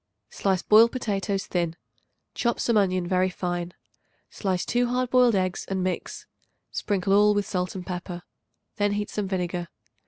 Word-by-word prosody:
Slice 190 -2 0
boiled 225 +2 +6
potatoes 200 -5 -2
thin; 170 -2 -1 0.6
chop 235 -1 0
some 235 - +1
onion 185 -3 +2
very 185 +1 +2
fine; 175 -1 -4 0.6
slice 185 -3 -1
2 245 +1 +1
hard 250 0 -1
boiled 250 -3 +5
eggs 185 -1 0
and 190 -1 -1
mix. 185 -1 -3 0.5
Sprinkle 195 -1 0
all 210 +1 +5
with 205 -1 +1
salt 180 0 -2
and 185 -1 -6
pepper. 175 -1 -5 0.5
Then 205 -1 +1
heat 205 0 -3
some 210 -2 -2
vinegar. 180 -2 -2
195 Hz, 155 wpm, -26 LUFS, 180-210 Hz, 0.6 s, boiled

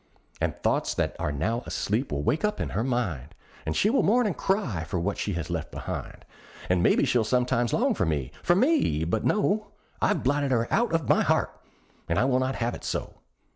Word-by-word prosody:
And - - 0
thoughts - - +1
that - - -1
are 75 - -1
now 110 - -1
asleep 115 +7 -1
will 70 0 -2
wake 145 - 0
up 210 0 0
in - - -2
her 110 - -1
mind, 105 - -2 0.3
And 80 - -1
she 210 - +3
will 270 - +3
mourn 240 +4 +3
and 200 - 0
cry 145 - -1
for 85 +2 -3
what 100 +4 -2
she 100 - -1
has 85 -3 -4
left - - -3
behind; - - -6 0.4
And 90 -1 +3
maybe - - +4
she'll 120 -2 +2
sometimes 125 +1 +1
long 260 +2 +2
for 95 - 0
me 70 -5 -1
for 175 - +3
me 250 - +2
but 90 +7 -1
no! 210 0 +1 0.3
I've - - +1
blotted 140 +1 +1
her 115 -3 +1
out 240 +1 +2
of 165 -6 0
my - - +4
heart, - - +1 0.5
and 85 - +1
I 125 - +3
will 130 -1 +2
not 130 0 -1
have 120 0 -1
it - - -8
so. - - -4
120 Hz, 215 wpm, -27 LUFS, -, 0.5 s, maybe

